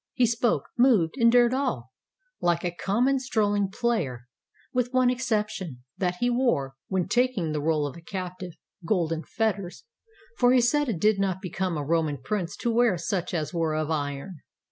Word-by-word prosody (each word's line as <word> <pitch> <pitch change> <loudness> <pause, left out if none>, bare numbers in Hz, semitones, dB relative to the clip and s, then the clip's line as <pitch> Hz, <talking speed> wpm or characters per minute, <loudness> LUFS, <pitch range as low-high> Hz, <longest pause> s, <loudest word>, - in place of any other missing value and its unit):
He 250 - +4
spoke, 235 +1 +1 0.2
moved, 225 -11 +4
endured 240 0 +5
all, 150 - -2 0.5
like 170 -1 +1
a 175 - -1
common 240 +10 +1
strolling 205 -6 0
player, 175 - -1 0.5
with 250 -1 0
one 255 -1 +3
exception, 210 - -2
that 180 -2 -1
he 245 +7 0
wore, 240 - +1
when 190 -2 -1
taking 245 -10 +1
the 150 -1 -2
role 155 -1 +1
of 145 - -5
a 170 - -11
cap 185 +1 -6
tive, 180 -2 -7 0.3
golden 165 -3 0
fetters, 200 -5 -2 0.6
for 245 0 +5
he 255 - +6
said 285 +4 +2
it 195 -8 -2
did 210 +1 +3
not 190 -2 0
become 185 -2 -3
a 145 - -3
Roman 155 -2 +1
prince 180 +5 -3
to 235 - +1
wear 230 -5 +3
such 175 +1 -2
as 160 -1 -2
were 165 -2 0
of 155 0 -1
iron. 145 +3 -3
190 Hz, 175 wpm, -26 LUFS, 165-240 Hz, 0.6 s, he